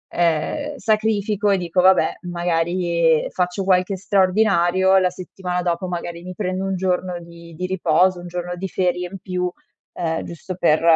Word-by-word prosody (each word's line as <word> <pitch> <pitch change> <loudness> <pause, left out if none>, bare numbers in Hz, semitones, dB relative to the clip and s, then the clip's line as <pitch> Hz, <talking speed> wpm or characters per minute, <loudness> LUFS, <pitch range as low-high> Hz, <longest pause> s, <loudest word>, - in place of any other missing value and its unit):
ehm, 175 - 0
sacrifico 210 -2 +1
e 195 - +3
dico: 175 0 -1
"Vabbè 185 -3 +5
magari 170 -1 +1
faccio 180 +2 -1
qualche 185 +1 +2
straordinario." 190 -1 +3
La 185 -1 +3
settimana 180 0 -4
dopo 175 +1 -1
magari 170 -1 -5
mi 185 0 -7
prendo 185 -1 -2
un 195 0 -1
giorno 180 -1 -1
di 170 0 -13
di 180 +3 -3
riposo, 185 0 +2
un 175 - -8
giorno 175 0 -4
di 190 +2 -4
ferie 180 0 -1
in 195 - -6
più, 180 -1 -2 0.4
ehm, 165 -1 -2
giusto 175 +2 -7
per 165 -3 +3
180 Hz, 160 wpm, -21 LUFS, 175-190 Hz, 0.4 s, Vabbè